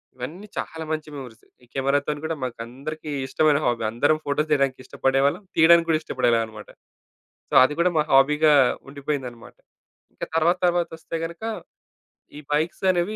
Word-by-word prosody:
ఇవన్నీ 160 +12 -8
చాలా 160 0 -4
మంచి 155 -1 -3
మెమోరీస్. 125 -5 -10 0.2
ఈ - - -21
కెమెరాతోని 145 +2 0
కూడా, 160 0 -2
మాకు 125 -2 -4
అందరికీ 150 +5 -7 0.2
ఇష్టమైన 150 +1 +2
హాబీ. 115 -2 0
అందరం 145 +7 +2
ఫోటోస్ 150 +2 -1
దిగడానికి 135 -3 +1
ఇష్టపడేవాళ్ళం. 135 +5 +1
తీయడానికి 170 +1 +6
కూడా 155 -1 +3
ఇష్టపడేవాళ్ళం 115 -6 +1
అన్నమాట. 110 -1 -12 0.8
సో, - - -12
అది 140 - +2
కూడా 180 - +4
మా 155 - +5
హాబీగా 150 +3 +5 0.4
ఉండిపోయిందన్నమాట. 135 -4 -5 0.6
ఇంక - - -10
తరువాత, 170 +3 +2
తరువాత 175 -1 +1
వస్తే 165 +1 -6
గనుక 170 +6 -9 0.9
ఈ - - -7
బైక్సనేవి 175 +5 0
150 Hz, 145 wpm, -23 LUFS, 135-160 Hz, 0.9 s, తీయడానికి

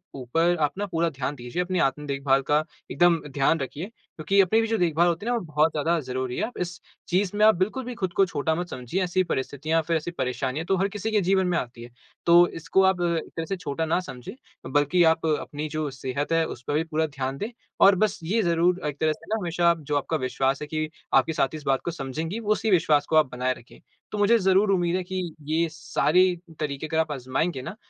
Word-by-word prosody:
ऊपर 165 +7 +1
आप 150 -1 +3
अपना 205 +6 -4
पूरा 170 -3 0
ध्यान 140 -1 -4
दीजिए 125 +7 -4
अपनी, 180 0 -1
आत्म-देखभाल 135 -1 +1
का 150 +3 +1 0.3
एकदम 175 -1 +4
ध्यान 145 +4 +2
रखिए। 140 +5 -5
क्योंकि 195 -4 -3
अपनी 220 +4 +3
भी 225 - -1
जो 225 0 0
देखभाल 170 -1 +2
होती 170 +4 -1
है 240 - 0
ना - - +2
वो - - -4
बहुत 155 +1 +2
ज्यादा 160 +3 0
ज़रूरी 130 -2 -4
है। - - -1
आप 245 - -12
इस 180 +2 -4 0.3
चीज़ 185 +1 +1
में 210 +1 +4
आप 220 - +6
बिल्कुल 205 +9 -1
भी 250 0 -6
ख़ुद 185 -6 -3
को 195 - +4
छोटा 160 -2 -1
मत 175 +1 -4
समझिए। 130 +10 -3
ऐसी 185 +1 +1
परिस्थितियाँ 145 0 -2
या - - +4
फिर 165 +1 0
ऐसी 165 +2 -5
परेशानी 130 -1 -2
है, 165 - -4
तो 190 +2 +1
हर 195 +2 +1
किसी 210 +2 -4
के 210 - +3
जीवन 190 0 +2
में 175 -1 +1
आती 120 -4 -5
है। 120 - -10 0.4
तो 175 +1 +7
इसको 175 +4 0
आप 190 -1 +3
एक 170 -2 -1
तरह 165 - -2
से 195 - -2
छोटा 160 -2 -3
ना 165 +3 +1
समझें 130 -8 -8 0.4
बल्कि 145 +5 +3
आप 160 - -2
अपनी 150 -1 -2
जो 155 0 -2
सेहत 135 +3 -4
है 165 0 +3
उसपे 120 +2 -5
भी 155 - +2
पूरा 160 -1 -1
ध्यान 135 -1 -4
दें। 210 - -3 0.3
और 195 0 +8
बस 210 +1 0
ये 210 +8 +1
ज़रूर 175 +1 +2
एक 145 -1 -5
तरह 155 0 +2
से 155 +2 -16
ना 220 - +2
हमेशा 170 -2 +2
जो 150 -1 -3
आपका 160 +3 -1
विश्वास 135 +1 -1
है 150 - -4
कि 155 0 -2 0.2
आपके 135 +4 +4
साथी 150 0 0
इस 150 - -11
बात 135 -1 +3
को 170 - -1
समझेंगी, 160 - -4
उसी 215 0 0
विश्वास 155 -5 +3
को 160 - +1
आप 155 -4 +4
बनाएँ 125 +1 -1
रखें। 120 - -17 0.3
तो 210 - -4
मुझे 210 +3 +4
ज़रूर 195 +1 +3
उम्मीद 175 -2 +1
है 185 - -1
कि 180 -3 -4
ये 165 +2 +2
सारे 165 +2 +2 0.4
तरीके 150 0 -3
अगर 160 - -2
आप 160 -2 0
आज़माएँगे 135 +3 -2
ना, 170 +9 -7
165 Hz, 240 wpm, -25 LUFS, 145-180 Hz, 0.4 s, और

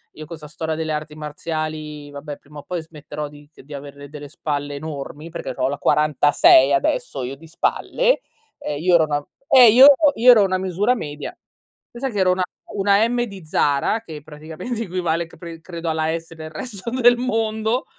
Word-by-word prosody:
io 155 - -9
con 165 - -8
'sta 150 -1 -11
storia 160 0 -3
delle 160 0 -3
arti 150 0 -4
marziali 155 -1 -5
vabbè 145 +1 -7
prima 145 +1 -13
o - - -11
poi 180 - -4
smetterò 150 -1 -7
di 145 0 -16
ch - - -16
di 145 +3 -13
avere 140 0 -9
delle 145 -1 -9
spalle 145 -1 -4
enormi 150 +1 -7
perché 165 -6 -6
c'ho 130 - 0
la 145 - -4
46 145 -2 +4
adesso 135 -1 0
io 130 +2 -5
di 160 +4 -15
spalle, - - 0 0.4
ehm, 145 -1 -4
io 180 +3 +2
ero 165 - +5
una 145 -1 -2 0.2
eh 255 -7 +8
io 255 +4 +9
ero 285 +1 +7
io 240 +3 +4
ero 215 -4 +6
una 185 -1 0
misura 190 +6 +1
media. 150 - -6 0.6
Pensa 260 +3 -4
che 210 - -5
ero 185 -1 +4
una 185 0 0 0.3
una 200 +2 +3
M 245 0 0
di 195 -6 -10
Zara 150 +6 +1
che 155 -7 -9
praticamente 155 +10 -6
equivale 170 -4 -2
cr - - -17
p 165 -2 -9
credo 170 0 -6
alla 160 0 -1
S 165 0 -17
nel 160 -1 -9
resto 205 +6 -6
del 245 -1 +4
mondo. 225 0 -1
160 Hz, 195 wpm, -21 LUFS, 150-205 Hz, 0.6 s, io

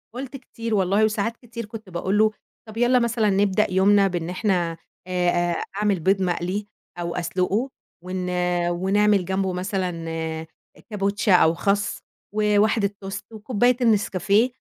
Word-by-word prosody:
قُلت 270 +2 -6
كتير 230 -3 -4
والله 195 +2 +2
وساعات 220 +2 -1
كتير 235 -1 -8
كنت 215 -2 -10
باقول 185 +3 -1
له: 215 0 +4 0.4
"طَب 220 - -10
يالّا 245 +1 +4
مثلًا 230 -3 +1
نبدأ 200 +1 +2
يومنا 195 +2 +4
بإن 175 -2 -3
إحنا 180 -4 0 0.3
آآ" 175 -1 +1 0.2
أعمل 205 -3 +1
بيض 190 +4 +2
مقلي 185 +3 -1 0.3
أو 170 0 -3
أسلُقه 185 +8 -1 0.3
ون 185 0 -4 0.4
ونعمل 195 +2 +2
جنبه 190 0 -1
مثلًا 180 -2 -2 0.9
كابوتشا 205 0 +1
أو 165 -2 +5
خَس 200 +4 0 0.4
وواحدة 210 -1 +2
toast 195 - -4
وكوباية 240 +3 +1
الNescafe 210 +1 +2
200 Hz, 130 wpm, -23 LUFS, 185-215 Hz, 0.9 s, أو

